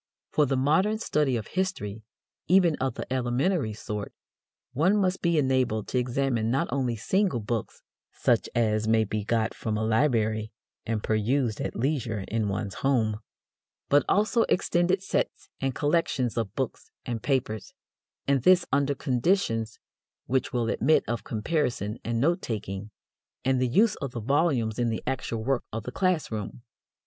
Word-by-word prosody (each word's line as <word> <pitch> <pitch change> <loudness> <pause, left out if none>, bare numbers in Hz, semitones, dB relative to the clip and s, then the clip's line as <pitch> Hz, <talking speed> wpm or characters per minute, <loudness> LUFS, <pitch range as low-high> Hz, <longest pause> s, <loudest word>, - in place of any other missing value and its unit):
For 150 -2 +3
the 135 0 0
modern 160 +11 +2
study 150 - +1
of 110 - -5
history, 150 - -3 0.5
even 180 -3 +5
of 130 0 -1
the - - -5
elementary 130 - 0
sort, 105 -1 -6 0.6
one 175 +10 +3
must 190 -2 +1
be 170 -2 +2
enabled 130 -6 +1
to 125 - +1
examine 125 -2 0
not 135 +8 +1
only 130 -4 0
single 185 - +1
books, 110 0 -4 0.3
such - - +1
as 110 -2 +1
may 110 0 +4
be 105 0 -3
got 110 +1 0
from 110 -1 -3
a 110 - -1
library 110 -3 +1 0.4
and 110 -1 -1
perused 110 +2 0
at - - -3
leisure 120 -6 -1
in 110 -1 0
one's 100 0 -3
home, 115 -6 +1 0.7
but 145 0 +5
also 215 +3 +3
extended 180 +2 +2
sets - - -2
and 135 -2 -1
collections 145 -6 +1
of 115 -3 -2
books 130 -3 -3 0.2
and 120 -3 -3
papers, 110 -7 -2 0.5
and 140 -2 +3
this 185 +6 +5
under 140 +1 +2
conditions 125 - 0 0.5
which 130 +1 0
will 120 -2 0
admit 155 +7 +3
of 120 -1 -2
comparison 115 - -1
and 115 0 -1
note 170 +8 +2
taking 105 -2 -4 0.6
and 130 -1 +2
the 130 - +3
use 210 - +4
of 135 -4 -5
the 120 - -3
volumes 125 -3 +1
in 120 -1 +2
the 110 - -3
actual 120 -4 -2
work 130 0 0
of 110 0 -4
the 125 - -6
class 185 -2 0
room. 110 +2 -5
125 Hz, 160 wpm, -27 LUFS, 110-150 Hz, 0.7 s, even